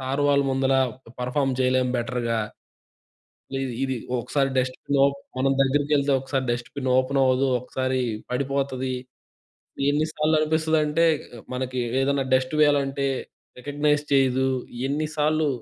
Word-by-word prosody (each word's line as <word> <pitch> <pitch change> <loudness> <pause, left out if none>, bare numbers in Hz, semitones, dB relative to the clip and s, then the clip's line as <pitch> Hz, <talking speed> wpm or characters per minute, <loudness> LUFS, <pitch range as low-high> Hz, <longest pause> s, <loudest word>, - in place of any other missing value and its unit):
Sir 135 +2 -2
వాళ్ళు 140 0 +3
ముందల 135 0 +1 0.5
perform 135 +1 0
చేయలేం 130 0 +2
బెటర్‌గా. 120 -2 -1 1.2
ఇది, 135 - -1 0.2
ఇది 130 -1 -1 0.2
ఒకసారి 135 +3 0
డస్ట్‌బిన్ 130 +2 -1
ఓ - - +7 0.3
మనం 135 +1 +2
దగ్గరికెళ్తే 145 +1 +2
ఒకసారి 135 0 -2
డస్ట్‌బిన్ 120 +3 -3
ఓపెన్ 130 +2 +1
అవ్వదు, 130 +1 +3
ఒకసారి 130 +1 -2 0.3
పడిపోతుంది. 130 0 -1 1.0
ఎన్ని 150 +2 +2
సార్లు 155 +1 +1
అనిపిస్తదంటే 155 0 +2 0.5
మనకి 130 0 -3 0.2
ఏదన్నా 140 0 +1
డస్ట్ 130 +2 +2
వేయాలంటే 140 -2 +2 0.5
రికగ్నైజ్ 145 +2 0
చేయదు. 130 -1 +3 0.4
ఎన్ని 150 +3 -1
సార్లు 155 +1 +2
135 Hz, 115 wpm, -24 LUFS, 130-145 Hz, 1.2 s, ఓ